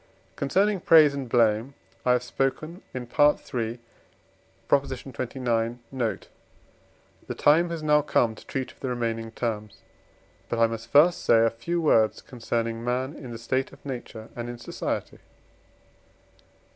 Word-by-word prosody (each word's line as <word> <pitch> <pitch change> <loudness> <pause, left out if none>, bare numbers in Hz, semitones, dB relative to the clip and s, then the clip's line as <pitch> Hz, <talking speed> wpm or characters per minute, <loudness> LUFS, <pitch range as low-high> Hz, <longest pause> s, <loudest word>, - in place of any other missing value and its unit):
Concerning 195 +8 +1
praise 155 -4 +6
and 135 -3 -5
blame 115 +2 +2 0.3
I 125 - +6
have 125 0 +1
spoken 155 +7 -2
in 125 - -5
III. 120 -3 +1 0.9
xxix. 125 -3 -1 0.2
note: 125 -4 -2 1.0
the - - -4
time 165 +4 +4
has 165 -2 -5
now 150 -1 +4
come 120 -5 +2
to - - -14
treat 130 -1 -3
of - - -24
the 130 - -3
remaining 115 -2 -2
terms. 110 -3 -4 0.7
But 120 - -1
I 115 - +5
must 115 0 -5
first 160 +5 +5
say 115 -1 +5
a 115 - +2
few 145 +10 -3
words 110 -9 +3
concerning 115 -1 -3
man 125 +3 -1
in 130 - -9
the 115 - -6
state 130 +3 -1
of - - -17
nature 120 -4 -7
and 120 0 -5
in 120 - -6
society. 120 - -4
125 Hz, 145 wpm, -26 LUFS, 115-140 Hz, 1.0 s, praise